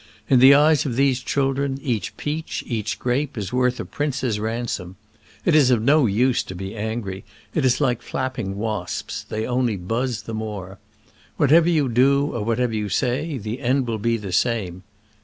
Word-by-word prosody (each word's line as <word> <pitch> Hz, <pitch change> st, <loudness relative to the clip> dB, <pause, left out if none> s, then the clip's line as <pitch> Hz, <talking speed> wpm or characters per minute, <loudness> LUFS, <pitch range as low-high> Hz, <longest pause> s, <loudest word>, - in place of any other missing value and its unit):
In 130 Hz, -, +6 dB
the 135 Hz, +2 st, +8 dB
eyes 150 Hz, 0 st, +4 dB
of 125 Hz, -5 st, -3 dB
these 135 Hz, -1 st, +2 dB
children 135 Hz, +1 st, -1 dB
each 120 Hz, -9 st, -3 dB
peach, 155 Hz, +2 st, -4 dB
each 105 Hz, -6 st, -3 dB
grape, 125 Hz, +4 st, -1 dB
is 100 Hz, -1 st, -4 dB
worth 125 Hz, 0 st, +1 dB
a -, -, -4 dB
prince's 130 Hz, -7 st, -2 dB
ransom. 110 Hz, -5 st, -3 dB, 0.5 s
It 175 Hz, -, +3 dB
is 145 Hz, -4 st, +5 dB
of 125 Hz, -3 st, +4 dB
no 140 Hz, +3 st, +4 dB
use 125 Hz, +5 st, +2 dB
to 95 Hz, -, -8 dB
be 95 Hz, +3 st, -6 dB
angry: 105 Hz, -3 st, -4 dB, 0.3 s
it 155 Hz, -, 0 dB
is 130 Hz, -1 st, +3 dB
like 125 Hz, -5 st, +1 dB
flapping 120 Hz, -7 st, -4 dB
wasps 105 Hz, -4 st, -3 dB
— -, -, -31 dB
they 110 Hz, +1 st, -2 dB
only 125 Hz, -4 st, 0 dB
buzz 115 Hz, +5 st, -2 dB
the 115 Hz, -, -7 dB
more. 105 Hz, -3 st, -6 dB, 0.6 s
What 145 Hz, -, +2 dB
ever 170 Hz, +2 st, +6 dB
you 155 Hz, -5 st, +2 dB
do 140 Hz, +4 st, +3 dB
or 115 Hz, -, -2 dB
whatever 115 Hz, +1 st, 0 dB
you 105 Hz, -1 st, -2 dB
say, 135 Hz, -, -1 dB
the 110 Hz, +1 st, -5 dB
end 130 Hz, +1 st, +1 dB
will 115 Hz, -2 st, -3 dB
be 115 Hz, +2 st, +1 dB
the 100 Hz, -4 st, -6 dB
same. 95 Hz, -4 st, 0 dB
120 Hz, 190 wpm, -22 LUFS, 110-135 Hz, 0.6 s, the